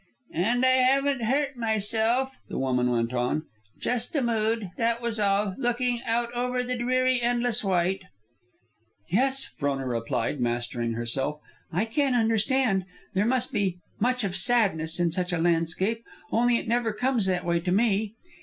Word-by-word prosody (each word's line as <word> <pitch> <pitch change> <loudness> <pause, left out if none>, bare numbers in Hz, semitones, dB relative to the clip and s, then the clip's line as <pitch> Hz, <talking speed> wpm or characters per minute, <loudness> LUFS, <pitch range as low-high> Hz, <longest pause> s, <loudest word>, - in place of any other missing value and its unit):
"And 235 +9 +1
I 255 0 +5
haven't 270 +1 +3
hurt 275 +2 0
myself," 225 +4 +1
the - - -4
woman 125 -2 +1
went 120 0 0
on. 125 +5 0 0.4
"Just 245 +7 -2
a 280 - +2
mood, 225 -4 0
that 230 0 0
was 235 -2 -3
all, 200 -1 +2
looking 245 -1 0
out 235 +1 0
over 250 +1 -1
the 250 0 -2
dreary 255 +1 +1
endless 240 -1 0
white." 190 0 +1 1.1
"Yes," 265 +7 +2
Frona 140 -2 -1
replied, 120 +2 -2
mastering 120 -1 -1
herself; 130 +6 -2 0.3
"I 180 +7 0
can 265 +3 +1
understand. 225 -2 +2 0.3
There 200 +3 +1
must 255 +1 0
be 195 -5 0 0.2
much 250 +2 +1
of 190 -2 -2
sadness 190 -8 +2
in 170 -1 +2
such 180 +2 -2
a 175 - 0
landscape, 175 +7 0 0.3
only 240 +1 +3
it - - -5
never 230 -1 +1
comes 245 -3 0
that 180 -2 0
way 170 -1 +1
to 180 +1 -2
me. 210 +1 +1
220 Hz, 155 wpm, -26 LUFS, 175-245 Hz, 1.1 s, I